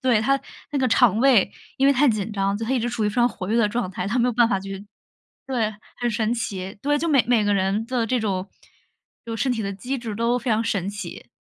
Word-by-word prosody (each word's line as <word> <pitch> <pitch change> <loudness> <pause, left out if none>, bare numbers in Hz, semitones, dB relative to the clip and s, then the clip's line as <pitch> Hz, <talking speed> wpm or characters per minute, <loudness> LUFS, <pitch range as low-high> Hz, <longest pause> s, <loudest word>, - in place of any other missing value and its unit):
对， 250 -5 +3
她 275 +4 +2 0.3
那 285 - -1
个 260 - +2
肠 225 -3 +4
胃 250 -6 +4 0.3
因 275 +1 +5
为 - - +6
太 280 +2 +4
紧 215 -2 -1
张 200 -1 0
就 225 - -4
她 240 - -4
一 260 - +2
直 240 +1 -1
处 235 -3 -2
于 - - +2
非 210 - -6
常 240 0 +4
活 185 -4 -7
跃 225 - +1
的 220 -3 +3
状 225 -4 -2
态， 180 0 -4
她 240 +4 0
没 245 - +3
有 - - 0
办 235 0 +4
法 215 -6 0
去 195 +1 -7 0.6
对， 225 -5 -1 0.2
很 240 -1 0
神 220 +2 0
奇。 195 -4 -4
对， 290 +1 +2
就 335 - -1
每 280 -5 +4
每 240 -3 +3
个 205 0 +2
人 195 +3 0
的 245 -2 0
这 250 0 0
种 195 -2 -2 0.8
就 230 -1 -5
身 260 +4 0
体 225 -2 -2
的 200 - -3
机 250 +8 -4
制 230 -4 -5
都 235 +3 +1
非 250 - -3
常 220 +1 +2
神 200 -4 -1
奇。 205 -4 -8
225 Hz, 285 characters per minute, -23 LUFS, 205-245 Hz, 0.8 s, 为